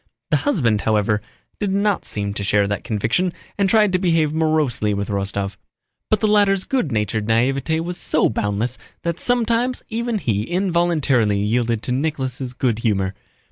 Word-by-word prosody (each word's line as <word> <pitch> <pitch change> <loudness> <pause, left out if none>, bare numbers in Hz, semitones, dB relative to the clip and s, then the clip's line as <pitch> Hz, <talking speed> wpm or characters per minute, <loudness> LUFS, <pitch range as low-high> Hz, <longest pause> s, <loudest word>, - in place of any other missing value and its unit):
The - - +5
husband, 120 - +1
however, 105 -1 +1 0.4
did 200 -2 -1
not 200 0 +1
seem 100 -1 -2
to 100 - -3
share 100 0 +3
that 105 0 -3
conviction 115 - 0 0.2
and 200 -1 +1
tried 210 -3 +4
to 185 - +3
behave 165 -4 +2
morosely 155 -10 +1
with 100 +1 -3
Rostóv. 100 0 -2 0.5
But 215 - +2
the 215 - +3
latter's 200 -2 +3
good 255 - -1
natured 105 0 -1
naïveté 135 +7 +1
was 175 +1 -4
so - - +2
boundless 105 +4 -1 0.2
that 170 0 -2
sometimes 245 +1 +1
even 235 0 -1
he 110 - 0
involuntarily 170 - +1
yielded 115 +2 0
to - - -3
Nicholas' 130 -2 -2
good 120 -3 0
humor. 100 -4 0
130 Hz, 160 wpm, -21 LUFS, -, 0.5 s, The